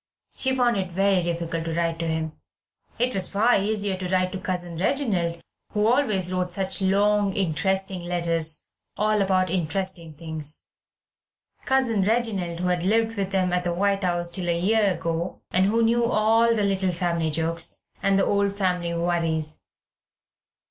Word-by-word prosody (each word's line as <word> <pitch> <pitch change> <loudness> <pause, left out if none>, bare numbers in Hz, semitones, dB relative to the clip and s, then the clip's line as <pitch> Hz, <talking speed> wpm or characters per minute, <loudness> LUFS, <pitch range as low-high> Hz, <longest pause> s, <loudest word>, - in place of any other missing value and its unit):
She 260 -1 +1
found 245 -3 +2
it 185 -2 -3
very 195 +1 +2
difficult 170 -1 -3
to 165 -1 -3
write 165 -1 -1
to 165 - -2
him. 160 -1 -2 0.7
It 250 +1 +1
was 190 -2 +1
far 225 +5 +3
easier 205 -1 0
to 185 -1 -4
write 185 0 +1
to 190 - -5
Cousin 175 -2 -3
Reginald, 185 - 0 0.3
who 210 -1 +1
always 215 -7 +2
wrote 180 -1 -1
such 190 +1 0
long, 200 +1 +2
interesting 190 +1 -1
letters, 165 -3 0 0.3
all 215 0 +2
about 185 -2 +1
interesting 175 -2 -2
things 155 -1 -5 1.0
Cousin 255 -6 +2
Reginald 195 -5 0
who 180 - 0
had 180 -1 0
lived 225 +4 +1
with 195 -2 -2
them 185 -2 +1
at 180 0 +1
the 175 -1 -1
White 200 +1 +1
House 175 -1 0
till 175 0 -2
a 170 0 +1
year 205 +1 +3
ago, 165 +2 -4
and 185 +1 +3
who 230 +3 +2
knew 235 +1 +3
all 225 0 +3
the 210 - 0
little 195 -2 +2
family 170 -2 -1
jokes, 165 +2 -2 0.2
and 195 0 +2
the - - +3
old 200 -1 +1
family 180 -4 -1
worries. 165 -2 -1
185 Hz, 165 wpm, -24 LUFS, 170-205 Hz, 1.0 s, far